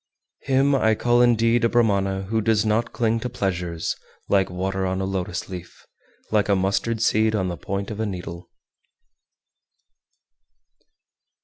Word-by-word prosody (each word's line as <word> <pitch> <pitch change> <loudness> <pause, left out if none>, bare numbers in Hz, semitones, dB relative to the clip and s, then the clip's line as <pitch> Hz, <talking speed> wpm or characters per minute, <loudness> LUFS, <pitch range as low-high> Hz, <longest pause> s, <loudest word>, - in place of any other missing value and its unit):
401. 135 0 +3
Him - - 0
I 110 0 +4
call 120 +2 +3
indeed 115 -1 +3
a 115 - +4
Brahmana 100 -5 +1
who 110 +3 -1
does 110 0 +2
not 110 +2 +1
cling 115 -1 0
to 125 - -4
pleasures, 90 -7 -2 0.3
like 95 -1 +2
water 95 +1 -2
on 95 0 -1
a 95 - -1
lotus 95 -1 -3
leaf, 90 -2 -10 0.5
like 105 -1 +2
a 100 - +4
mustard 100 +4 0
seed 110 0 +2
on 95 -3 0
the 90 - -3
point 100 +4 -4
of 105 - -6
a 110 - 0
needle. 90 -3 -7
105 Hz, 150 wpm, -23 LUFS, 95-115 Hz, 0.5 s, I